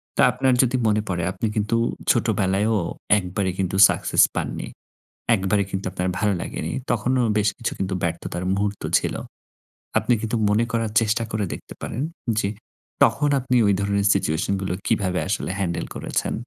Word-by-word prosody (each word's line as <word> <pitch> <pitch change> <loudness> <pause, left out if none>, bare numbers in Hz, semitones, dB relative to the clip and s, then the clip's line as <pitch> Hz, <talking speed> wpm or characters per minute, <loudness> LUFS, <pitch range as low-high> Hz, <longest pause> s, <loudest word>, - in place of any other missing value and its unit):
তা - - +3
আপনার 130 0 +2
যদি 130 0 +1
মনে 105 0 +2
পড়ে 85 -2 -1
আপনি 110 +3 -2
কিন্তু 105 +2 0 0.4
ছোটবেলায়ও 105 -1 +1 0.4
১ 95 - -2
বারে 95 -2 +1
কিন্তু 95 0 -1
সাকসেস - - +3
পাননি। - - -3 0.7
১ 100 - 0
বারে 105 -1 +3
কিন্তু 95 0 -3
আপনার 90 -1 -2
ভালো 105 -1 +2
লাগেনি। 80 - -4 0.2
তখনও 125 +2 +1 0.2
বেশ 105 -1 +2
কিছু 115 - -2
কিন্তু 95 0 -2
ব্যর্থতার 85 +1 -3
মুহূর্ত 100 0 -2 0.2
ছিল। - - -3 0.8
আপনি 125 - +2
কিন্তু 115 +1 -2
মনে 105 +3 +3
করার 115 -2 -1
চেষ্টা 115 +1 +1
করে 105 -2 -1
দেখতে - - -9
পারেন 125 - -4 0.4
যে 100 - 0 0.6
তখন 145 0 +3
আপনি 125 -1 -1
ওই 100 - +4
ধরনের 100 0 +1
সিচুয়েশন 90 0 0
গুলো 95 - -2
কিভাবে 95 -5 +1
আসলে 95 -1 -2
হ্যান্ডেল 85 -3 -1
করেছেন। - - -2
105 Hz, 165 wpm, -23 LUFS, 95-115 Hz, 0.8 s, ওই